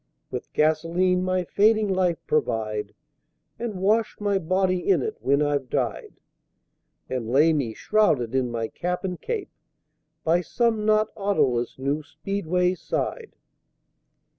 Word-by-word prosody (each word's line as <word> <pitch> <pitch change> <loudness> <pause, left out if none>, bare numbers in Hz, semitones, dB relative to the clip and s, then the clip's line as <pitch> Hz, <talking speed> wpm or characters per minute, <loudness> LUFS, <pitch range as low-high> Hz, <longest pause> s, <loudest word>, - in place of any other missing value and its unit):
With - - -6
Gasoline 165 +4 +2
my 185 0 0
fading 215 +4 +3
Life 185 -3 +1
provide, 110 -7 -1 0.6
And 230 -3 -3
wash 215 +4 +1
my 200 -2 +1
Body 185 +1 0
in 390 - +4
it 435 -1 -4
when 140 +2 +2
I've 145 -3 -1
died, - - -3 0.9
And 125 -3 -3
lay 150 +6 +5
me, 125 -8 -1
shrouded 145 - +2
in 130 -2 +1
my 115 -1 -2
Cap 180 - -3
and 180 -2 -4
Cape, 455 -4 -4 0.7
By 170 +2 +3
some 225 +2 0
not 215 0 +3
Autoless 135 - 0
new 140 +3 -1
Speedway's 180 +2 -1
side. 455 -3 -3
180 Hz, 130 wpm, -25 LUFS, 140-205 Hz, 0.9 s, lay